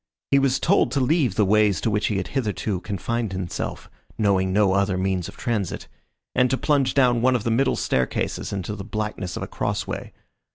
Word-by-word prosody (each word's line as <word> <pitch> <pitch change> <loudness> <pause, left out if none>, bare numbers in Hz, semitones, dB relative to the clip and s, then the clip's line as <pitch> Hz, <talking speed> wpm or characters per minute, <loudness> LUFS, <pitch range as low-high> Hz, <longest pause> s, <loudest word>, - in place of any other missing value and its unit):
He 140 - +6
was 135 -1 +2
told 195 +8 +3
to 140 - +1
leave 130 - +2
the 105 - +3
ways 105 0 +3
to 110 - 0
which 105 0 +1
he 105 - 0
had 95 - -3
hitherto 105 -6 -2
confined 105 +3 -3
himself 95 -2 -4 0.3
knowing 95 -3 +2
no 100 -1 +3
other 100 -1 +1
means 95 -2 -1
of - - -11
transit 110 -6 -2 0.5
and 125 0 +3
to 130 - +1
plunge 145 -3 +1
down 125 -4 +4
one 130 +1 +3
of 120 - -1
the 115 - 0
middle 130 +4 +2
staircases 65 -1 -1
into 100 +1 -3
the 100 - -7
blackness 105 -3 -4
of - - -4
a - - -5
cross - - -2
way. - - -5
105 Hz, 205 wpm, -23 LUFS, 95-125 Hz, 0.5 s, He